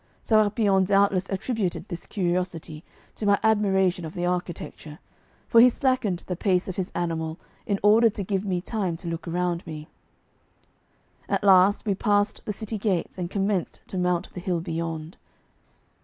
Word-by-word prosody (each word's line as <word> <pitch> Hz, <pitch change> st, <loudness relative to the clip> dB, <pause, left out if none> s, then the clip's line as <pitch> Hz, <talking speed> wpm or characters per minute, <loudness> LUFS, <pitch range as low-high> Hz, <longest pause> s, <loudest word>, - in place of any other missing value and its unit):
Sérapion 210 Hz, -3 st, +3 dB
doubtless 195 Hz, 0 st, +2 dB
attributed 195 Hz, -2 st, -2 dB
this 175 Hz, -3 st, -7 dB
curiosity 175 Hz, -4 st, -2 dB, 0.3 s
to 210 Hz, -, -4 dB
my 200 Hz, 0 st, +4 dB
admiration 190 Hz, -5 st, +2 dB
of 160 Hz, -, -7 dB
the 175 Hz, -, -2 dB
architecture, 175 Hz, -3 st, -4 dB, 0.5 s
for 230 Hz, -, +6 dB
he 250 Hz, -, +8 dB
slackened 240 Hz, -8 st, 0 dB
the 180 Hz, -, -3 dB
pace 180 Hz, 0 st, +1 dB
of 190 Hz, -, -4 dB
his 185 Hz, -2 st, -3 dB
animal 165 Hz, -2 st, -2 dB, 0.3 s
in 200 Hz, -2 st, 0 dB
order 220 Hz, +3 st, +6 dB
to 200 Hz, -1 st, -5 dB
give 195 Hz, 0 st, -1 dB
me 185 Hz, -3 st, -1 dB
time 190 Hz, -5 st, -2 dB
to 170 Hz, -, -9 dB
look 165 Hz, +1 st, -4 dB
around 175 Hz, 0 st, -1 dB
me. 155 Hz, -1 st, -7 dB, 1.4 s
At -, -, 0 dB
last 195 Hz, +2 st, +5 dB
we 205 Hz, -, +1 dB
passed 205 Hz, +1 st, +1 dB
the -, -, -2 dB
city 215 Hz, +1 st, -5 dB
gates 190 Hz, -3 st, -1 dB
and 175 Hz, -1 st, -3 dB
commenced 195 Hz, -2 st, -1 dB
to 190 Hz, -, -5 dB
mount 180 Hz, -1 st, -1 dB
the -, -, -6 dB
hill 175 Hz, -1 st, -1 dB
beyond. 165 Hz, 0 st, -4 dB
185 Hz, 160 wpm, -25 LUFS, 175-205 Hz, 1.4 s, he